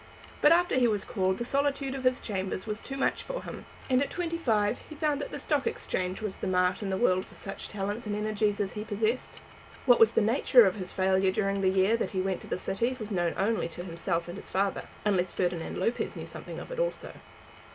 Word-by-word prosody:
But 295 - +7
after 350 +1 +4
he 245 - +5
was 210 -3 0
called 190 -2 0
the 240 - -3
solitude 275 0 0
of 265 -1 -5
his 255 0 +3
chambers 190 -2 -3
was 215 0 -3
too 270 - -6
much 270 - +1
for - - -5
him, - - -8 0.2
and 255 0 +3
at 280 - 0
twenty 335 -2 -2
five 215 -6 +1
he 310 - -8
found 295 -1 0
that - - -4
the - - -5
Stock 290 -3 0
Exchange 185 +3 -2
was 210 -3 -3
the - - -3
mart 180 +1 +2
in 200 - -2
the 190 - 0
world 185 -5 +3
for - - -16
such 195 - -7
talents 205 +3 -3
and 205 - -1
energies 210 -1 0
as 200 -2 -1
he 210 - -4
possessed. 220 +3 -2 0.5
What 245 -3 +6
was 225 0 +6
the - - +4
nature 235 +2 +6
of 190 - +2
his 185 -2 -6
failure 190 0 +2
during 195 0 0
the 190 - +4
year 190 +4 +3
that 230 - -2
he 190 - 0
went 190 -1 0
into - - -10
the - - -2
city, 235 +7 -1
was 215 -1 -6
known 175 -3 0
only 210 -2 +1
to 170 +1 -8
himself 170 -1 -2
and 175 +2 -6
his - - -9
father, 195 +1 0 0.2
unless 185 -4 +2
Ferdinand 175 -2 -2
Lopez 235 - -1
knew - - -6
something - - -8
of - - -8
it - - -4
also. - - -2
210 Hz, 240 wpm, -29 LUFS, 190-250 Hz, 0.5 s, But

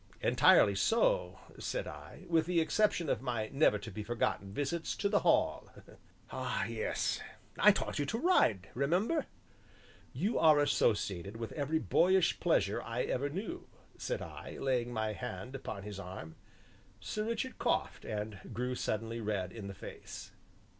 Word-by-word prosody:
"Entirely 100 - +6
so," 235 - +2 0.2
said - - -2
I, - - -10
"with 165 -1 +2
the 180 -1 +2
exception 170 +1 +2
of - - 0
my 120 -4 -2
never 135 -6 +4
to 105 +2 -8
be 105 - -5
forgotten 105 -3 -1
visits 150 - -2
to 200 - 0
the 200 0 +3
Hall." - - +2 0.6
"Ah, - - -2
yes, - - -1 0.4
I 210 - +8
taught 195 - -2
you 145 - +1
to 225 - -1
ride, 115 - +3
remember." 180 - +1 0.8
"You 215 +4 0
are 155 -2 +7
associated 100 -8 +1
with 115 -1 -5
every 150 +2 0
boyish 180 +2 +3
pleasure - - +2
I - - -2
ever 140 +3 -1
knew," 215 - -5 0.3
said - - -3
I, - - -8
laying 125 -3 0
my 110 -2 -1
hand 125 +1 -6
upon 130 -7 -6
his 100 -1 -7
arm. 90 -4 -8 0.6
Sir 215 0 -3
Richard 230 +3 -3
coughed - - 0
and 105 -1 -4
grew 125 +3 -2
suddenly 115 -1 -2
red 100 -4 -2
in 105 -2 -7
the 100 - -7
face. - - -9
130 Hz, 155 wpm, -33 LUFS, 105-175 Hz, 0.8 s, I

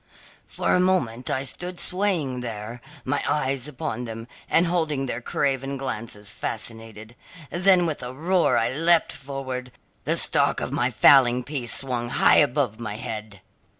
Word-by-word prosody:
"For - - -1
a - - +3
moment 150 -11 0
I 130 - -1
stood 180 +6 -4
swaying 180 -10 +1
there, 115 0 -7 0.2
my 140 +2 -1
eyes 135 -2 -1
upon 125 -4 -5
them, 115 0 -8 0.2
and 170 - +3
holding 160 -5 -1
their 125 -2 -4
craven 135 +2 -2
glances 105 -5 -4
fascinated. 110 0 -6 0.4
Then 185 0 +3
with 155 -5 -3
a 125 0 -6
roar 170 +6 +1
I 115 - +1
leapt 165 +3 +2
forward, 130 -2 -6 0.3
the - - +1
stock - - +3
of - - -4
my 120 - 0
fowling 125 +1 +5
piece 130 -5 +3
swung 125 -3 +1
high - - +4
above 125 -5 +1
my 105 -3 -5
head. 105 -2 -7
130 Hz, 150 wpm, -24 LUFS, 115-150 Hz, 0.4 s, fowling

